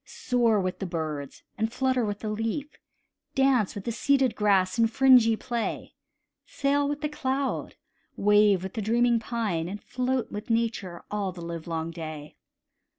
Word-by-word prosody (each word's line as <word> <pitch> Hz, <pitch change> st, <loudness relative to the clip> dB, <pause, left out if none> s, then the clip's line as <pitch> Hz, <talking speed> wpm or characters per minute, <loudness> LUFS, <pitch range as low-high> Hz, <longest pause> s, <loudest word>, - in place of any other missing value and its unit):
Soar 235 Hz, -4 st, +1 dB
with 185 Hz, -1 st, -2 dB
the 195 Hz, -, -3 dB
birds, 155 Hz, -5 st, -5 dB, 0.2 s
and 220 Hz, +1 st, 0 dB
flutter 260 Hz, 0 st, +1 dB
with 205 Hz, -1 st, -3 dB
the 215 Hz, -, -3 dB
leaf; 225 Hz, +7 st, -3 dB, 0.6 s
Dance 265 Hz, -6 st, +3 dB
with 200 Hz, -, -6 dB
the 235 Hz, -, -2 dB
seeded 265 Hz, +1 st, +2 dB
grass 200 Hz, 0 st, +2 dB
in 230 Hz, -, +5 dB
fringy 240 Hz, -1 st, +5 dB
play; 235 Hz, +1 st, -4 dB, 0.5 s
Sail 280 Hz, 0 st, +1 dB
with 290 Hz, 0 st, -3 dB
the 300 Hz, -, 0 dB
cloud, 275 Hz, -2 st, -2 dB, 0.4 s
wave 205 Hz, -2 st, +4 dB
with 190 Hz, -, -6 dB
the 220 Hz, -, -3 dB
dreaming 235 Hz, +2 st, +3 dB
pine, 215 Hz, -8 st, -2 dB
And 205 Hz, +2 st, -5 dB
float 255 Hz, +3 st, -2 dB
with 210 Hz, +3 st, -6 dB
Nature 225 Hz, -6 st, -1 dB
all 205 Hz, -2 st, -1 dB
the 175 Hz, -2 st, -9 dB
livelong 165 Hz, -1 st, -4 dB
day. 155 Hz, -3 st, -8 dB
220 Hz, 155 wpm, -27 LUFS, 185-250 Hz, 0.6 s, in